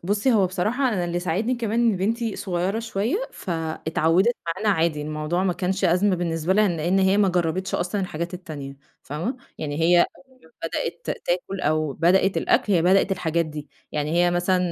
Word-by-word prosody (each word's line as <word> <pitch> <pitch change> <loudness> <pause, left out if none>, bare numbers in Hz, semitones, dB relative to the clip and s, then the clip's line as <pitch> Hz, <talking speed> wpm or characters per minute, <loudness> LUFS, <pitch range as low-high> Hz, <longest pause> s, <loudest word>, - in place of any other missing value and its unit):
بُصّي 205 +6 +2
هو 200 -4 +4
بصراحة 220 +9 0
أنا 190 -7 -1
اللي 175 0 -2
ساعدني 195 +9 0
كمان 230 -1 -1
إن 230 -5 +3
بنتي 225 +3 -1
صغيّرة 185 +3 -1
شوية، 225 - -1 0.2
فاتعودت 165 +4 0
معانا 185 +6 -1
عادي، 160 -5 +1
الموضوع 155 +4 -2
ما 180 - +2
كانش 190 +2 -1
أزمة 185 +2 +3
بالنسبة 165 0 -1
لها 210 0 +4
لإن 175 +3 0
هي 190 +1 +3
ما 200 -2 +4
جربتش 180 +1 -1
أصلًا 185 +3 -1
الحاجات 175 -1 -4
التانية، 145 -6 -8 0.3
فاهمة، 170 - -4 0.2
يعني 150 0 -3
هي 175 +2 +5
أول 265 +7 -3
ما 160 - -20 0.2
بدأت 170 +1 -4 0.2
تأكل 180 +2 -1
أو 155 -2 0
بدأت 185 +5 +3
الأكْل 205 - +2
هي 170 -3 +3
بدأت 195 +2 +4
الحاجات 170 -2 0
دي، 150 -2 -8 0.2
يعني 150 +1 -1
هي 175 +1 +3
مثلًا 175 +1 +1
180 Hz, 180 wpm, -24 LUFS, 165-200 Hz, 0.3 s, هي